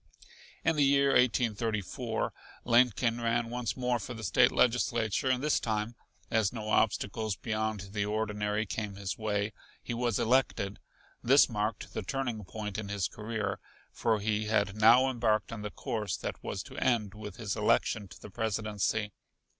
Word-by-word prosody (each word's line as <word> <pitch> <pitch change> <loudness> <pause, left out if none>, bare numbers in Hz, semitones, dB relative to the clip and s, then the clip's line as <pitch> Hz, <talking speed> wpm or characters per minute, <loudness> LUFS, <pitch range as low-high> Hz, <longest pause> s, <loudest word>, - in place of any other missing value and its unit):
In 165 -1 +3
the 145 - +5
year 140 0 +4
1834, 115 -2 +1 0.3
Lincoln 120 -1 +3
ran 115 0 0
once 120 -2 -2
more 125 -1 0
for 120 +3 -6
the 110 - -8
State 120 +5 +4
Legislature, 120 -1 +2
and 130 +1 +1
this 150 - +3
time, 110 0 -2 0.4
as 110 -4 +2
no 110 -3 -5
obstacles 110 -1 +1
beyond 110 -3 -3
the 100 0 -1
ordinary 105 0 -1
came 105 -1 -4
his 100 +1 -4
way, 105 -1 -1 0.3
he - - -4
was 120 -2 0
elected. 110 -5 +1 0.4
This 135 +4 +6
marked 105 -1 -3
the - - -2
turning 120 0 -3
point 105 +1 -5
in 100 -2 -5
his 100 -3 0
career, 105 -3 -3 0.3
for 110 -2 +1
he 105 +1 0
had 100 -2 +1
now 115 +5 +6
embarked 115 -5 +1
on 115 -2 -5
the 105 - -4
course 105 0 -3
that - - -6
was - - -4
to - - -12
end 115 -6 +1
with 105 -3 -8
his 110 -4 -3
election 105 -2 +1
to - - -14
the 105 - -11
Presidency. 105 -1 -1
110 Hz, 160 wpm, -30 LUFS, 105-120 Hz, 0.4 s, This